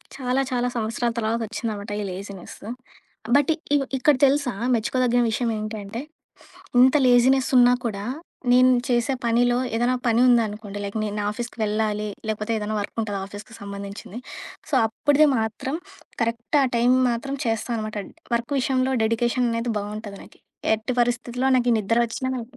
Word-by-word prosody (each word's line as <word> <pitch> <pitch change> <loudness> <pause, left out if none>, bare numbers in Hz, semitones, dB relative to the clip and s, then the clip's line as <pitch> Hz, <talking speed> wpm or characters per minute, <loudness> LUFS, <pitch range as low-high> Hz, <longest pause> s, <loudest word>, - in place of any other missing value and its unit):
చాలా, 260 0 0
చాలా 245 -1 +1
సంవత్సరాల 230 +1 -1
తర్వాతొచ్చిందనమాట 220 -2 -3
ఈ - - -3
లేజినెస్సు. 195 +1 -9 0.7
బట్ 285 +2 +4 0.2
ఇగొ 285 -2 +3
ఇక్కడ 285 +3 +4
తెలుసా 275 -2 +2 0.2
మెచ్చుకోదగిన 245 +1 +2
విషయమేంటంటే, 220 -1 -3 0.8
ఇంత 260 +3 +6
లేజీనెసున్నా 250 0 +5
కూడా, 205 -4 -3 0.5
నేను 255 +1 +6 0.2
చేసే 240 +1 +1
పనిలో 240 +1 +3 0.2
ఏదన్నా 240 +2 +2
పని 230 0 +3
ఉందనుకోండి 215 -4 +1
లైక్, 200 +2 -5
నేను 210 -1 -3
నా 205 - -2
ఆఫీస్‌కి 240 +2 -6
వెళ్ళాలి, 210 0 -1 0.2
లేకపోతే 215 +1 -2
ఏదన్నా 215 0 -3
వర్కుంటది 205 0 -3
ఆఫీస్‌కి 205 +2 -11
సంబంధించింది. 200 +1 -7 0.5
సో, 290 - 0
అప్పటిది 290 +7 +3
మాత్రం 220 +6 -2 0.5
కరెక్ట్ 230 +5 0
ఆ - - +4
టైం 240 +2 +4 0.2
మాత్రం 275 +4 -3
చేస్తా 225 +1 -1
అనమాట. 215 -1 -4 0.4
వర్క్ 235 +4 -2
విషయంలో 260 0 +1
డెడికేషననేది 235 +1 0
బావుంటది 205 0 -6
నాకి. - - -18 0.3
ఎట్టి 220 +3 -3
పరిస్థితిలో 245 +1 0
నాకి 245 -1 +2
నిద్ర 230 +3 +1
వచ్చినా 260 +3 -4
నాకి 245 +2 -8
230 Hz, 135 wpm, -24 LUFS, 215-250 Hz, 0.8 s, ఇంత